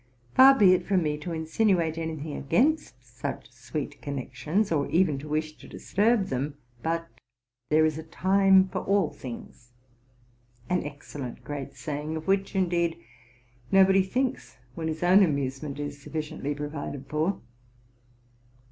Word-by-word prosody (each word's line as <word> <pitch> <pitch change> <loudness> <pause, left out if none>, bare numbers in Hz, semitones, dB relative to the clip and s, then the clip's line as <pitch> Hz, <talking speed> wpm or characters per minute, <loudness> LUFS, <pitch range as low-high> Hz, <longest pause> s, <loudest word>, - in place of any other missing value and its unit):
Far 270 +1 +8
be 190 -6 +7
it 180 -1 0
from 190 -3 +2
me 150 -1 0
to 170 +3 -6
insinuate 165 0 +1
any 160 -1 -3
thing 150 0 -6
against 275 - +1
such - - -6
sweet - - -6
connections, 150 - -2
or 145 -3 +1
even 165 -6 +2
to 150 - -9
wish 155 0 -2
to - - -13
disturb. 210 0 +1
them; 140 +3 -2 0.3
but 165 +3 -1 0.3
' 120 +1 -56
there 155 +1 +5
is 155 0 0
a - - -6
time 190 +3 +4
for 185 - -3
all 195 -4 +1
things,' 120 -1 -10 0.5
— 120 0 -32
an 180 - +2
excellent 145 -3 -8
great 145 -2 -6
saying, 150 0 -4
of 160 - -8
which, 195 +1 +1
indeed, 170 -3 +1 0.7
nobody 195 0 +6
thinks 255 +7 -2 0.2
when 160 +3 -4
his 160 +1 -3
own 185 +3 +6
amusement 140 -3 -1
is 145 -1 -5
sufliciently 150 -2 -4
provided 145 -2 -5
for. 155 +7 -1
160 Hz, 150 wpm, -27 LUFS, 145-190 Hz, 0.7 s, Far